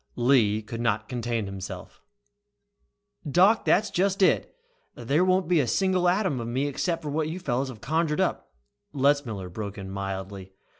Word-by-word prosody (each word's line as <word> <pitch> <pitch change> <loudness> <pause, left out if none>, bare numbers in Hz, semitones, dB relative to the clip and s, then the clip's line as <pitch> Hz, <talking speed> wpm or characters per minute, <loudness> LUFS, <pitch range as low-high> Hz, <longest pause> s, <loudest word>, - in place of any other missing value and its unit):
Lee 120 -4 +3
could 115 +2 -6
not 110 -2 0
contain 120 -3 -2
himself. 95 -1 -8 1.3
"Doc, 190 +9 +4
that's 215 +2 +3
just 195 +2 +1
it! - - +2 0.4
There 140 +8 +1
won't 185 -1 +2
be 175 -2 +3
a 135 - +1
single 185 - +2
atom 185 - 0
of 115 - -4
me 130 +4 -1
except 165 +3 -2
what 150 +1 -1
you 170 +3 -5
fellows 135 -5 -1
have 115 -5 -10
conjured 155 +4 0
up - - -1 0.2
" 105 +4 -52
Letzmiller 135 -9 +1
broke 100 0 -6
in 95 -1 -7
mildly. 95 0 -6
130 Hz, 160 wpm, -26 LUFS, 105-170 Hz, 1.3 s, Doc